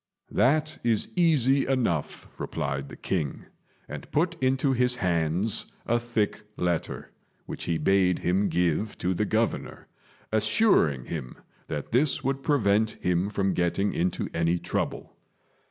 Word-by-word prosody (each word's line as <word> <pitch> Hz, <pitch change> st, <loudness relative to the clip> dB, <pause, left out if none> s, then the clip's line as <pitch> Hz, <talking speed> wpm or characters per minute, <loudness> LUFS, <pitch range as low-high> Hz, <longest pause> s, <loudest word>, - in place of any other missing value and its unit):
"That 155 Hz, +4 st, +2 dB
is 115 Hz, -3 st, +1 dB
easy 140 Hz, -6 st, +3 dB
enough," 120 Hz, -, -1 dB
replied 70 Hz, -1 st, -3 dB
the -, -, -9 dB
king, 80 Hz, -7 st, -3 dB, 0.4 s
and -, -, -8 dB
put 170 Hz, +3 st, +1 dB
into 130 Hz, +1 st, +2 dB
his 125 Hz, 0 st, +2 dB
hands 90 Hz, 0 st, 0 dB
a 120 Hz, +1 st, +2 dB
thick 115 Hz, -3 st, -1 dB, 0.2 s
letter, 85 Hz, -2 st, -2 dB, 0.3 s
which -, -, -6 dB
he 85 Hz, -, 0 dB
bade 95 Hz, 0 st, +3 dB
him 95 Hz, +3 st, +1 dB
give 90 Hz, +4 st, 0 dB
to 90 Hz, -, 0 dB
the 100 Hz, +4 st, 0 dB
Governor, 110 Hz, +2 st, -1 dB, 0.5 s
assuring 110 Hz, -, +3 dB
him 70 Hz, -7 st, -6 dB, 0.3 s
that 75 Hz, -2 st, -5 dB
this 135 Hz, +4 st, +2 dB
would 135 Hz, +1 st, -1 dB
prevent 110 Hz, -6 st, +2 dB
him 90 Hz, +2 st, +1 dB
from 100 Hz, -2 st, 0 dB
getting 90 Hz, +3 st, 0 dB
into 90 Hz, +2 st, -1 dB
any 85 Hz, +1 st, +1 dB
trouble. -, -, -3 dB
105 Hz, 135 wpm, -27 LUFS, 85-130 Hz, 0.5 s, easy